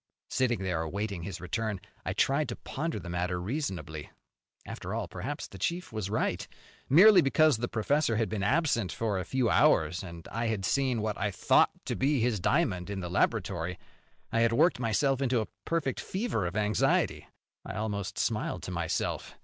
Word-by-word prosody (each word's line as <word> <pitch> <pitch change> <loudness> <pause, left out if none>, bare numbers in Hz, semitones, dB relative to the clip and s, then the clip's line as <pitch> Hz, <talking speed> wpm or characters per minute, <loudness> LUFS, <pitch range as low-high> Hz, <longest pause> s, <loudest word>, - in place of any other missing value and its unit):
Sitting 120 -6 +1
there 90 -4 -1
awaiting 100 +3 -3
his 90 0 -6
return, 105 +3 -2 0.2
I - - -2
tried 140 0 +1
to 120 - -3
ponder 155 -3 -4
the 90 - -9
matter 90 +1 -1
reasonably. 90 - -4 0.6
After - - -5
all, - - -2
perhaps - - -5
the 95 - -12
chief 170 - -2
was 105 -3 -3
right. 110 - -1 0.4
Merely 185 +6 +8
because 155 -1 +4
the 120 +2 -2
professor 120 +3 +1
had 110 0 +1
been 110 -2 -3
absent 120 - +1
for 105 -4 -1
a - - -2
few 130 0 +1
hours 90 - +3
and 85 -3 -9
I 115 +1 -1
had 105 -4 -1
seen 130 -4 +1
what 110 -1 -2
I 100 - +1
thought 95 - +4 0.2
to - - -2
be 140 +1 +2
his 115 -3 +1
diamond 100 - +1
in 100 -1 -3
the 90 -1 -5
laboratory, 90 -3 0 0.5
I 115 - +1
had 115 0 +3
worked 165 +4 +4
myself 130 +4 +1
into 125 -3 +2
a 110 - -2 0.2
perfect 155 -6 -1
fever 190 - -2
of 90 - -6
anxiety. 105 -1 +1 0.4
I - - -7
almost 100 -2 -3
smiled - - -1
to - - -5
myself. - - -2
110 Hz, 180 wpm, -29 LUFS, 95-135 Hz, 0.6 s, Merely